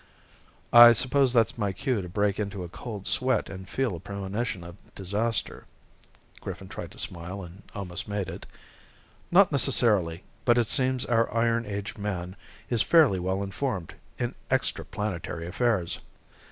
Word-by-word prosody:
"I 120 Hz, 0 st, +11 dB
suppose 130 Hz, +3 st, +3 dB
that's 115 Hz, -1 st, +2 dB
my 100 Hz, -3 st, 0 dB
cue 125 Hz, +2 st, -1 dB
to 90 Hz, -, -7 dB
break 100 Hz, +2 st, 0 dB
into 100 Hz, -3 st, -3 dB
a 85 Hz, -, -7 dB
cold 105 Hz, +1 st, -7 dB
sweat 130 Hz, -5 st, +1 dB
and 95 Hz, -1 st, -9 dB
feel 130 Hz, -8 st, -1 dB
a -, -, -7 dB
premonition 100 Hz, +1 st, -4 dB
of 85 Hz, +3 st, -11 dB, 0.2 s
disaster." 105 Hz, +3 st, -1 dB, 0.7 s
Griffin 95 Hz, 0 st, -7 dB
tried -, -, -7 dB
to -, -, -15 dB
smile 90 Hz, +3 st, -4 dB
and 90 Hz, +3 st, -12 dB
almost 90 Hz, -3 st, -4 dB
made 100 Hz, -3 st, -2 dB
it. -, -, -8 dB, 0.8 s
"Not 185 Hz, +1 st, +6 dB
necessarily, 105 Hz, -, +2 dB, 0.2 s
but 120 Hz, -1 st, +4 dB
it 120 Hz, -3 st, +2 dB
seems 130 Hz, -1 st, +2 dB
our 115 Hz, -1 st, +2 dB
iron 115 Hz, 0 st, +1 dB
age 100 Hz, +1 st, -5 dB
man 95 Hz, -3 st, -4 dB, 0.3 s
is 120 Hz, -3 st, +2 dB
fairly 150 Hz, -, +5 dB
well 95 Hz, +2 st, -1 dB
informed 100 Hz, -, -3 dB, 0.2 s
in -, -, -2 dB, 0.2 s
extraplanetary 85 Hz, -4 st, -2 dB
affairs." 95 Hz, -4 st, 0 dB
100 Hz, 150 wpm, -27 LUFS, 95-120 Hz, 0.8 s, I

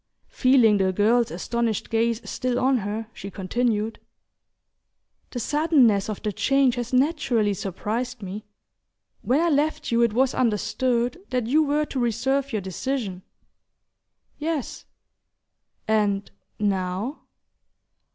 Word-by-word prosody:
Feeling 250 Hz, -5 st, +4 dB
the 190 Hz, -1 st, +2 dB
girl's 225 Hz, +5 st, +3 dB
astonished 235 Hz, -3 st, -2 dB
gaze 230 Hz, 0 st, 0 dB
still 250 Hz, -1 st, -2 dB
on 260 Hz, +1 st, +3 dB
her, 215 Hz, +2 st, -4 dB
she 195 Hz, -, -8 dB
continued: 215 Hz, +3 st, -1 dB, 1.3 s
"The 245 Hz, -, -5 dB
suddenness 260 Hz, -, +3 dB
of 210 Hz, -, -5 dB
the 210 Hz, -, 0 dB
change 270 Hz, +3 st, +3 dB
has 245 Hz, -1 st, -4 dB
naturally 255 Hz, -6 st, +2 dB
surprised 220 Hz, +6 st, -4 dB
me. 195 Hz, +3 st, -6 dB, 0.8 s
When 260 Hz, +4 st, +2 dB
I 340 Hz, +1 st, +2 dB
left 305 Hz, 0 st, 0 dB
you 235 Hz, 0 st, +3 dB
it 235 Hz, -2 st, +3 dB
was 260 Hz, +3 st, +2 dB
understood 245 Hz, -, 0 dB
that 250 Hz, -3 st, -1 dB
you 290 Hz, +7 st, +3 dB
were 300 Hz, 0 st, +1 dB
to 270 Hz, -, -4 dB
reserve 265 Hz, +4 st, 0 dB
your 215 Hz, -4 st, -2 dB
decision 190 Hz, 0 st, -3 dB, 0.6 s
" -, -, -49 dB
"Yes." 305 Hz, -3 st, -3 dB, 1.0 s
"And 205 Hz, -2 st, +1 dB, 0.3 s
now 195 Hz, +5 st, -1 dB
235 Hz, 120 wpm, -24 LUFS, 210-265 Hz, 1.3 s, Feeling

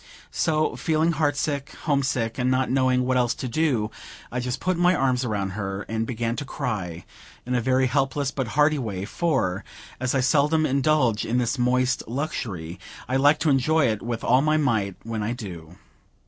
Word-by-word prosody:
So, 155 Hz, -1 st, +1 dB
feeling 160 Hz, +1 st, +1 dB
heart 145 Hz, -2 st, 0 dB
sick, 140 Hz, 0 st, -2 dB
home 145 Hz, -3 st, +2 dB
sick, 125 Hz, -4 st, -1 dB
and 125 Hz, +1 st, +1 dB
not 130 Hz, 0 st, +1 dB
knowing 130 Hz, -1 st, +2 dB
what 130 Hz, 0 st, +1 dB
else 120 Hz, -1 st, +1 dB
to 130 Hz, -, -5 dB
do, 120 Hz, -5 st, 0 dB, 0.4 s
I 125 Hz, -, -2 dB
just 125 Hz, 0 st, -3 dB
put 185 Hz, 0 st, 0 dB
my 175 Hz, +1 st, +3 dB
arms 130 Hz, -3 st, +1 dB
about 100 Hz, -5 st, -2 dB
her, 95 Hz, 0 st, -4 dB
and 110 Hz, +1 st, -3 dB
began 115 Hz, -1 st, -2 dB
to 145 Hz, -, -3 dB
cry 100 Hz, -, -4 dB, 0.4 s
in 125 Hz, -, -2 dB
a 125 Hz, -, +2 dB
very 130 Hz, +2 st, +2 dB
helpless 135 Hz, +2 st, 0 dB
but 135 Hz, -4 st, -3 dB
hearty 150 Hz, 0 st, +4 dB
way; 100 Hz, -6 st, -4 dB
for, 110 Hz, -, -1 dB, 0.4 s
as 130 Hz, +1 st, -1 dB
I -, -, +3 dB
seldom 150 Hz, +4 st, +3 dB
indulge 135 Hz, -5 st, +2 dB
in 120 Hz, -, -1 dB
this 125 Hz, +2 st, 0 dB
moist 125 Hz, +1 st, +2 dB
luxury, 110 Hz, -, -4 dB, 0.3 s
I 130 Hz, +2 st, +1 dB
like 145 Hz, +3 st, +5 dB
to 155 Hz, -, +3 dB
enjoy 140 Hz, +1 st, +3 dB
it 110 Hz, -2 st, -2 dB
with 115 Hz, -1 st, -4 dB
all 125 Hz, +2 st, +4 dB
my 155 Hz, +1 st, +2 dB
might, 110 Hz, -10 st, 0 dB
when 115 Hz, -1 st, -4 dB
I 110 Hz, +3 st, -1 dB
do. 90 Hz, -8 st, -8 dB
130 Hz, 190 wpm, -24 LUFS, 115-145 Hz, 0.4 s, like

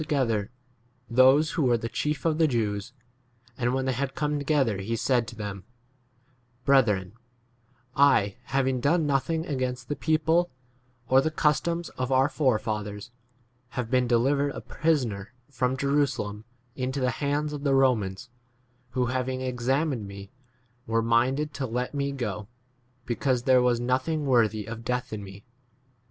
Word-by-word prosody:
together 120 Hz, -9 st, 0 dB, 0.6 s
those 130 Hz, +5 st, +5 dB
who -, -, -1 dB
were 125 Hz, -4 st, +3 dB
the 115 Hz, -, -4 dB
chief 150 Hz, +4 st, -2 dB
of 160 Hz, -1 st, +1 dB
the 160 Hz, -, +5 dB
Jews; 110 Hz, -3 st, -1 dB, 0.6 s
and 120 Hz, -1 st, 0 dB
when 130 Hz, 0 st, -1 dB
they 130 Hz, -, +1 dB
had 135 Hz, +2 st, -3 dB
come 150 Hz, -1 st, -1 dB
together 140 Hz, -8 st, +1 dB
he 110 Hz, +4 st, -2 dB
said 120 Hz, 0 st, +1 dB
to 115 Hz, -, -9 dB
them, 100 Hz, -3 st, -6 dB, 1.0 s
Brethren,* 105 Hz, -9 st, +3 dB, 0.8 s
I 120 Hz, -8 st, +4 dB
having 135 Hz, -1 st, 0 dB
done 160 Hz, +5 st, +2 dB
nothing 155 Hz, +4 st, 0 dB
against 130 Hz, -5 st, -3 dB
the 145 Hz, -, -1 dB
people 160 Hz, +3 st, +2 dB, 0.6 s
or 130 Hz, +1 st, +5 dB
the 155 Hz, -, 0 dB
customs 165 Hz, +3 st, 0 dB
of 130 Hz, +1 st, -1 dB
our 130 Hz, +2 st, +4 dB
forefathers 110 Hz, -6 st, -1 dB, 0.7 s
have 125 Hz, -2 st, -2 dB
been 125 Hz, -1 st, +3 dB
de 120 Hz, 0 st, +4 dB
livered 140 Hz, +3 st, +1 dB
a -, -, -6 dB
prisoner 125 Hz, -11 st, -1 dB, 0.2 s
from 130 Hz, -1 st, 0 dB
Jerusalem 140 Hz, -7 st, 0 dB, 0.3 s
18 130 Hz, -, -3 dB
into 130 Hz, +2 st, -1 dB
the 130 Hz, -1 st, +1 dB
hands 145 Hz, +3 st, -1 dB
of 145 Hz, -, -5 dB
the 140 Hz, -2 st, +3 dB
Romans, 120 Hz, -6 st, +1 dB, 0.7 s
who 125 Hz, -, +3 dB
having 130 Hz, +1 st, -2 dB
examined 130 Hz, -1 st, -1 dB
me 100 Hz, 0 st, -10 dB, 0.6 s
were 115 Hz, 0 st, +1 dB
minded 130 Hz, +6 st, +1 dB
to 135 Hz, -1 st, -3 dB
let 125 Hz, +3 st, -3 dB
me 140 Hz, -1 st, -1 dB
go, 110 Hz, -6 st, -4 dB, 0.6 s
because 125 Hz, 0 st, 0 dB
there 130 Hz, -1 st, +5 dB
was 125 Hz, -1 st, +2 dB
nothing 130 Hz, +5 st, 0 dB
worthy 110 Hz, -5 st, +2 dB
of 115 Hz, +1 st, -7 dB
death 125 Hz, 0 st, -2 dB
in 105 Hz, -1 st, -5 dB
me. 100 Hz, +1 st, -11 dB
130 Hz, 155 wpm, -27 LUFS, 115-140 Hz, 1.0 s, those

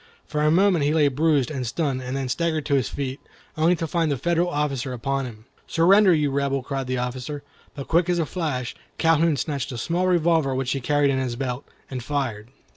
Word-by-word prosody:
For 150 Hz, -, -2 dB
a 150 Hz, -, +4 dB
moment 180 Hz, -1 st, +4 dB
he 150 Hz, +2 st, +2 dB
lay 150 Hz, -3 st, +4 dB
bruised 145 Hz, -1 st, +1 dB
and 130 Hz, -4 st, -3 dB
stunned, 135 Hz, 0 st, -1 dB
and 130 Hz, +1 st, -4 dB
then 135 Hz, -1 st, -2 dB
staggered 160 Hz, +2 st, -1 dB
to 145 Hz, -, -1 dB
his 135 Hz, -4 st, +2 dB
feet, 135 Hz, -1 st, -4 dB, 0.4 s
only 165 Hz, +3 st, +3 dB
to 165 Hz, -, -3 dB
find 165 Hz, -1 st, 0 dB
the 140 Hz, -, 0 dB
Federal 170 Hz, +4 st, +1 dB
officer 140 Hz, -5 st, -2 dB
upon 135 Hz, +3 st, -2 dB
him. 110 Hz, -2 st, -12 dB, 0.2 s
"Surrender, 190 Hz, +4 st, +5 dB
you 150 Hz, -4 st, +2 dB
Rebel!" 140 Hz, -1 st, 0 dB
cried 135 Hz, -1 st, -3 dB
the 130 Hz, 0 st, -1 dB
officer, 125 Hz, +4 st, -4 dB, 0.3 s
but 140 Hz, -, -7 dB
quick 170 Hz, +2 st, +2 dB
as 175 Hz, -, +2 dB
a 165 Hz, -, +1 dB
flash, 145 Hz, -7 st, -3 dB, 0.2 s
Calhoun 165 Hz, -1 st, +3 dB
snatched 140 Hz, 0 st, -3 dB
a 120 Hz, -, -5 dB
small 175 Hz, +9 st, 0 dB
revolver 165 Hz, -6 st, +2 dB
which 130 Hz, -1 st, -1 dB
he 135 Hz, -, -1 dB
carried 145 Hz, +2 st, +2 dB
in 130 Hz, -, 0 dB
his 125 Hz, -2 st, -2 dB
belt, 125 Hz, +1 st, -4 dB, 0.3 s
and 130 Hz, -2 st, -4 dB
fired. 130 Hz, -7 st, -3 dB
145 Hz, 215 wpm, -24 LUFS, 130-165 Hz, 0.4 s, Surrender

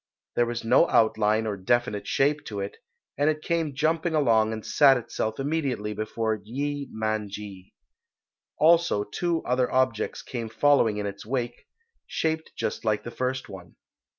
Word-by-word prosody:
There 120 Hz, -, +3 dB
was 120 Hz, 0 st, -3 dB
no 115 Hz, -, +4 dB
outline 110 Hz, 0 st, +3 dB
or 105 Hz, -2 st, -2 dB
definite 105 Hz, +1 st, 0 dB
shape 145 Hz, +2 st, +1 dB
to 105 Hz, -2 st, -5 dB
it, 100 Hz, +1 st, -5 dB, 0.4 s
and 145 Hz, +2 st, +4 dB
it 155 Hz, 0 st, -2 dB
came 165 Hz, -4 st, -1 dB
jumping 160 Hz, +3 st, +1 dB
along 115 Hz, -7 st, +3 dB
and 110 Hz, -1 st, -5 dB
sat 135 Hz, -3 st, +5 dB
itself 110 Hz, -1 st, -3 dB
immediately 135 Hz, -8 st, -1 dB
before 110 Hz, 0 st, -2 dB
Yee 140 Hz, +5 st, -3 dB
Man 110 Hz, -1 st, -2 dB
ji. 100 Hz, -2 st, -9 dB, 0.8 s
Also 165 Hz, -8 st, +4 dB
two 170 Hz, +10 st, -2 dB
other 125 Hz, 0 st, +1 dB
objects 130 Hz, -4 st, 0 dB
came 115 Hz, -3 st, -5 dB
following 120 Hz, -5 st, +3 dB
in 105 Hz, -, -2 dB
its 100 Hz, 0 st, -6 dB
wake, 120 Hz, 0 st, -4 dB, 0.4 s
shaped 160 Hz, 0 st, -2 dB
just -, -, -3 dB
like 110 Hz, -2 st, 0 dB
the 120 Hz, -, -7 dB
first 130 Hz, +1 st, -2 dB
one. 90 Hz, -4 st, -11 dB
120 Hz, 155 wpm, -26 LUFS, 110-145 Hz, 0.8 s, sat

